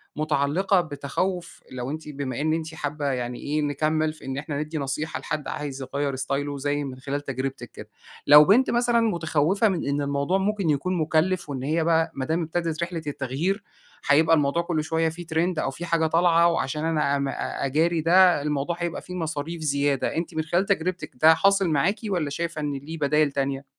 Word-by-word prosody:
متعلقة 155 +6 +1
بتخوف، 160 +2 -4
لو 125 0 -5
أنتِ 155 0 -6
بما 140 -3 -4
إن 155 +1 +1
أنتِ 160 0 -4
حابة، 145 -1 -4
يعني 125 -3 -2
إيه، 150 +1 -1
نكمل 155 +2 0
في 155 - -15
إن 135 0 -4
إحنا 145 0 -4
ندي 155 +1 -4
نصيحة 140 +2 -3
لحد 150 - -4
عايز 140 -2 -5
يغير 140 +1 -2
ستايله 140 +2 -2
زي 145 +1 -1
من 130 -2 -7
خلال 140 +2 -3
تجربتِك 135 -3 -5
كده. - - -11 0.4
لو 150 +1 +9
بنت 245 - +4
مثلًا 240 0 +2
متخوفة 175 0 +1
من 185 -6 -2
إن 140 +1 0
الموضوع 140 +5 0
ممكن 195 -2 0
يكون 165 +6 0
مُكلف، 160 +2 +1
وإن 130 -2 -4
هي 160 +4 0
بقى 165 0 +2
ما 130 - -3
دام 165 +4 0
ابتدت 165 0 -2
رحلة 170 -1 -4
التغيير؛ 145 +7 -1 0.5
هيبقى 160 +3 +5
الموضوع 150 +2 +1
كله 170 -2 -1
شوية 160 +1 0
فيه 170 +2 -8
ترند 165 +1 0
أو 135 - -1
فيه 170 +6 -7
حاجة 165 -1 +1
طالعة 170 +1 +4
وعشان 155 -2 -1
أنا 150 -3 +1
ام 140 0 -1 0.4
أجاري 160 +4 +1
ده؛ 160 - -7 0.3
الموضوع 150 +3 -1
هيبقى 170 -1 -3
فيه 180 - -8
مصاريف 160 -1 -4
زيادة، 140 -2 0
أنتِ 165 0 -3
من 160 - 0
خلال 175 +5 +1
تجربتِك 185 -4 -1
ده 160 +1 +8
حاصل 195 -1 +3
معاكِ 160 +7 +2
والّا 180 -8 -1
شايفة 165 +2 -3
إن 145 -1 -2
ليه 145 +4 -6
بدايل 150 0 +2
تانية؟ 140 0 -2
155 Hz, 190 wpm, -25 LUFS, 140-170 Hz, 0.5 s, لو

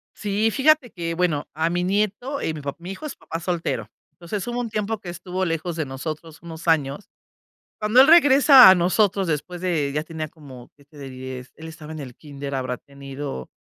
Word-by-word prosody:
Sí, 210 +2 0
fíjate 285 -1 +3
que, 165 -2 -4
bueno, 165 -4 0
a 160 +2 0
mi 175 +1 -1
nieto, 210 +8 -1
eh, 160 - -1
mi 155 - -7
papá 140 -1 -5
mi 175 +2 -7
hijo 195 +11 -8
es 290 - -6
papá 165 - -6
soltero. 165 - -3 0.2
Entonces, 180 +3 -5
hubo 240 0 -2
un 240 -2 -3
tiempo 215 0 -2
que 185 - -9
estuvo 180 +2 -4
lejos 165 0 -2
de 160 -2 -2
nosotros 155 +4 -7
unos 165 0 -10
años. 150 +2 0 0.7
Cuando 215 +4 +3
él 270 - +6
regresa 285 - +8
a 190 - +8
nosotros 190 +2 +2
después 165 +3 -3
de 160 -6 0
ya 150 - -1
tenía 160 -1 -5
como, 135 -6 -13
que 140 - -22
te 150 +1 -19
diré, 130 0 -7 0.2
él 160 - -10
estaba 160 -1 -10
en 155 - -7
el 125 -4 -9
kínder, 140 -2 -7
habrá 130 -1 -3
tenido 140 - -8
165 Hz, 205 wpm, -23 LUFS, 145-200 Hz, 0.7 s, regresa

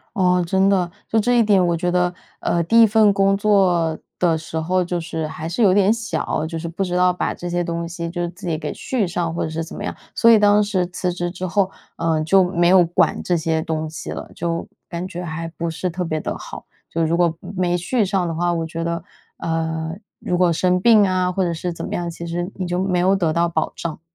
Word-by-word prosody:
哦， 180 -2 +3
真 190 +3 +2
的。 180 -3 +2 0.2
就 220 - +2
这 245 +3 +2
一 - - +5
点， 195 -4 +4
我 170 -1 +1
觉 175 +1 -1
得， 180 0 +1 0.3
呃， 170 - 0
第 230 +7 +5
1 - - +9
份 215 -1 +5
工 195 0 +3
作 185 -6 +2 0.2
的 170 -3 +3
时 160 0 -6
候 180 +3 +1
就 175 0 -2
是 165 -1 -4
还 160 +1 -6
是 215 +7 0
有 185 -2 +5
点 200 +1 +4
小， 225 -8 -2
就 165 0 -5
是 170 - -5
不 175 +4 -3
知 180 -1 -2
道 180 0 +4
把 180 - -2
这 175 - -6
些 175 0 0
东 170 0 -3
西 170 0 -5
就 175 0 -4
是 175 - -1
自 180 +1 -9
己 160 -2 0
给 150 -1 -4
续 235 -7 -1
上 170 -1 -2
或 - - -2
者 160 - -2
是 165 +1 -3
怎 160 - -9
么 205 - -6
样。 - - -4 0.2
所 230 - +4
以 225 - +8
当 205 0 +5
时 190 -3 0
辞 180 0 -2
职 175 0 -3
之 185 +1 -5
后， 190 +1 +1 0.3
呃 160 -2 0
就 190 +4 +5
没 175 -1 +1
有 180 -1 +6
管 170 - +1
这 175 - +1
些 160 -1 0
东 160 -1 -3
西 160 - -7
了， - - -6
就 170 0 -3 0.2
感 175 +1 -5
觉 180 -1 -6
还 165 +1 -4
不 170 0 -2
是 180 +3 -3
特 180 +2 -3
别 155 -2 -2
地 - - -4
好。 - - -9 0.3
就 165 0 0
如 165 +2 +1
果 170 -2 +2
没 180 -3 -1
续 205 +5 0
上 185 -2 0
的 165 - -3
话， 175 +1 +1
我 165 - -1
觉 165 +1 -4
得， 170 0 -2 0.3
嗯， 160 +1 -3 0.2
如 180 - -1
果 175 -2 +3
生 180 +2 +2
病 215 -1 +6
啊 185 -1 +1
或 190 +1 0
者 175 - 0
是 170 +1 -3
怎 - - -7
么 - - -5
样， 175 - -2
其 170 0 -6
实 175 +2 -3
你 185 -2 -3
就 175 0 -1
没 180 -2 +1
有 190 +2 +3
得 165 -5 +1
到 170 +1 +2
保 - - -1
障。 165 -2 -5
175 Hz, 270 characters per minute, -21 LUFS, 165-190 Hz, 0.3 s, 1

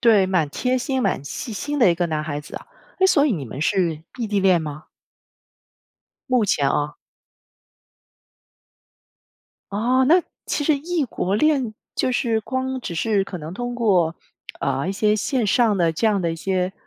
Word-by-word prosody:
对， 220 -6 +5
蛮 180 -5 +1
贴 250 - 0
心、 265 0 -1
蛮 - - 0
细 190 - -5
心 290 +7 -3
的 230 -9 +6
一 - - +2
个 175 0 0
男 155 -2 -2
孩 145 -2 -3
子 145 - -11
啊。 - - -9 0.3
哎， 380 - +5
所 290 -6 +4
以 280 - +2
你 155 -9 -3
们 130 +3 -7
是 165 -2 0 0.2
异 235 - -1
地 205 -1 0
恋 185 -3 +4
吗？ 150 0 -7 1.5
目 250 -3 +3
前 145 -8 +2
哦。 145 +2 -1 2.8
哦， 245 +6 +2
那 350 +4 +6 0.3
其 290 - -1
实 310 - +4
异 325 +2 -1
国 195 -5 -2
恋， 265 -4 +2 0.2
就 - - 0
是 240 -5 +1
光 260 +3 -3
只 195 - -5
是 205 +2 +1
可 190 -1 -6
能 160 +2 -7
通 245 +3 -4
过， 185 -8 +2 0.4
呃， 140 +4 -1
一 - - +1
些 210 +1 +2
线 235 +2 0
上 220 0 +3
的 170 -3 +2
这 220 +8 +1
样 205 -2 +1
的 170 -2 0
一 - - -3
些， 185 +2 -1
205 Hz, 190 characters per minute, -22 LUFS, 170-250 Hz, 2.8 s, 的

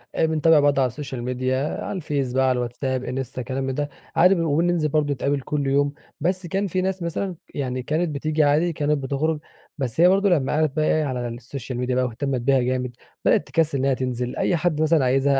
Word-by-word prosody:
آآ، - - +3
بنتابع 160 0 +4
بعض 145 -1 +3
على 130 - +4
السوشيال 130 -1 -6
ميديا 130 +3 -1
على - - -4
الفيس، 140 -6 -2
بقى 130 0 +2
على 125 - +1
الواتس 120 +2 -4
آب، 130 -1 0
انستا، 130 0 -4
كلام 130 +2 -3
من 135 0 -2
ده، 145 0 -2 0.3
عادي 185 +3 +6
وبننزل 165 0 +1
برضه 145 -1 +1
نتقابل 140 +1 -1
كل 145 0 -2
يوم. 140 +1 +2 0.3
بس 180 +3 -1
كان 195 +4 -1
في 185 +1 -1
ناس 190 -1 -2
مثلًا 175 +2 -2 0.2
يعني 130 -2 -3
كانت 160 +5 0
بتيجي 155 +2 +1
عادي 155 +4 +3
كانت 150 0 +1
بتخرج 145 +3 -1 0.4
بس 135 +3 -1
هي 175 - +8
برضه 195 +1 +3
لما 150 -7 +2
قعدت 155 -2 +1
بقى 155 -1 +2
إيه 155 - +2
على 125 -3 -2
السوشيال 120 +1 -6
ميديا 125 0 0
بقى 130 0 +2
واهتمت 125 +1 -2
بيها 135 +1 +3
جامد 125 0 -1 0.3
بدأت - - +3
تكسل 150 0 +1
إنها 135 0 +2
تنزل، 125 -1 -3
أي 180 - +1
حد 160 -2 0
مثلًا 155 -4 +3
عايزها 135 +1 +3
140 Hz, 215 wpm, -23 LUFS, 130-155 Hz, 0.4 s, هي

